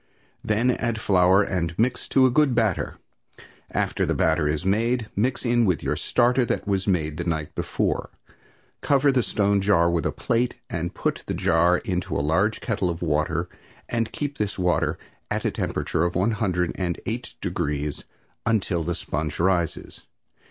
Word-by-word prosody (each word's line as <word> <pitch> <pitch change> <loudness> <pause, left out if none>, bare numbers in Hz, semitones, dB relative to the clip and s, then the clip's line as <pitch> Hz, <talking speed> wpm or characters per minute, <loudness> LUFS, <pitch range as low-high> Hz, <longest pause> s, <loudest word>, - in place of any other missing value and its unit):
Then 110 +4 +2
add 115 -2 -2
flour 95 -1 +4
and 85 -4 -2
mix 125 +3 0
to 135 -1 +5
a 130 - +4
good 135 -1 +3
batter; 110 -6 0 0.7
after - - -1
the - - 0
batter 80 -1 +2
is 75 +4 -1
made, 115 +3 +1
mix 125 +5 0
in 120 -3 +3
your 90 - 0
starter 125 +2 +2
that 115 - -2
was 100 -1 0
made 80 -5 0
the 85 - -2
night 80 -3 -2
before. - - -1 0.7
Cover 140 0 +3
the 130 -2 +2
stone 100 -2 +1
jar 85 -4 +3
with 85 -2 0
a - - -1
plate 120 +1 0 0.2
and 85 0 -3
put - - -1
the - - -2
jar 85 +2 +3
in 90 -4 -2
a - - -6
large 80 +9 +1
kettle 100 -6 -1
of 85 0 -4
water 80 +2 0 0.4
and 115 -1 -1
keep 145 -1 -4
this 105 -2 -2
water 90 -2 +1 0.3
at - - -2
a - - +2
temperature 80 - -1
of 85 0 -1
one 95 +6 +2
hundred 95 -6 0
and 85 -2 -3
eight 115 +2 -4
degrees 75 -5 -2 0.4
until 100 -6 +1
the 85 +2 -2
sponge 75 0 -3
rises. 85 -1 -1
95 Hz, 170 wpm, -24 LUFS, 85-115 Hz, 0.7 s, to